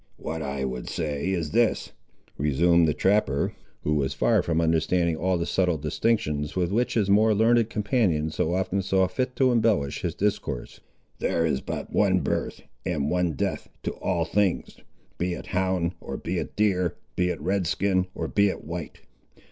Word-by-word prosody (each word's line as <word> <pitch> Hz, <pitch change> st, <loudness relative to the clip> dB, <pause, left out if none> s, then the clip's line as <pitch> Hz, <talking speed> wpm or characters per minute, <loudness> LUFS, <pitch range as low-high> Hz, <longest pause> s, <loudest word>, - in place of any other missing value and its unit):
"What 80 Hz, +1 st, -5 dB
I 70 Hz, -2 st, -3 dB
would 65 Hz, -2 st, -4 dB
say 75 Hz, +1 st, -2 dB
is 85 Hz, -6 st, -1 dB
this," 120 Hz, +3 st, +1 dB, 0.4 s
resumed 80 Hz, +4 st, +3 dB
the 75 Hz, -, +2 dB
trapper, 95 Hz, -9 st, +1 dB, 0.3 s
who 75 Hz, -, +1 dB
was 70 Hz, -3 st, 0 dB
far -, -, +3 dB
from 80 Hz, -1 st, 0 dB
understanding 85 Hz, +1 st, +2 dB
all 90 Hz, +3 st, 0 dB
the 85 Hz, -, -1 dB
subtle 90 Hz, -3 st, +1 dB
distinctions 75 Hz, -2 st, -1 dB
with 90 Hz, -1 st, 0 dB
which 120 Hz, +4 st, 0 dB
his 105 Hz, -4 st, +2 dB
more 105 Hz, +2 st, +4 dB
learned 115 Hz, +1 st, +3 dB
companion 100 Hz, -, +1 dB
so 85 Hz, +3 st, 0 dB
often 95 Hz, +1 st, 0 dB
saw 95 Hz, -1 st, +2 dB
fit 125 Hz, +7 st, -2 dB
to 130 Hz, -2 st, +3 dB
embellish 110 Hz, -, +1 dB
his 85 Hz, -2 st, -2 dB
discourse; 95 Hz, -11 st, -2 dB, 0.4 s
"there 85 Hz, -, +1 dB
is 75 Hz, -5 st, 0 dB
but -, -, -5 dB
one -, -, +3 dB
birth -, -, -2 dB, 0.2 s
and 75 Hz, -4 st, -1 dB
one 90 Hz, -2 st, +1 dB
death -, -, -3 dB
to -, -, -1 dB
all 85 Hz, -3 st, -1 dB
things, 95 Hz, +2 st, 0 dB, 0.4 s
be 90 Hz, 0 st, 0 dB
it -, -, -8 dB
hound, 95 Hz, -2 st, 0 dB
or -, -, -5 dB
be -, -, -3 dB
it -, -, -6 dB
deer; 95 Hz, -5 st, +1 dB, 0.2 s
be 90 Hz, 0 st, +1 dB
it -, -, -3 dB
red 90 Hz, +3 st, 0 dB
skin, 95 Hz, 0 st, +1 dB
or -, -, -3 dB
be 100 Hz, 0 st, +3 dB
it -, -, -5 dB
white. 85 Hz, +1 st, -6 dB
90 Hz, 180 wpm, -26 LUFS, 80-100 Hz, 0.4 s, more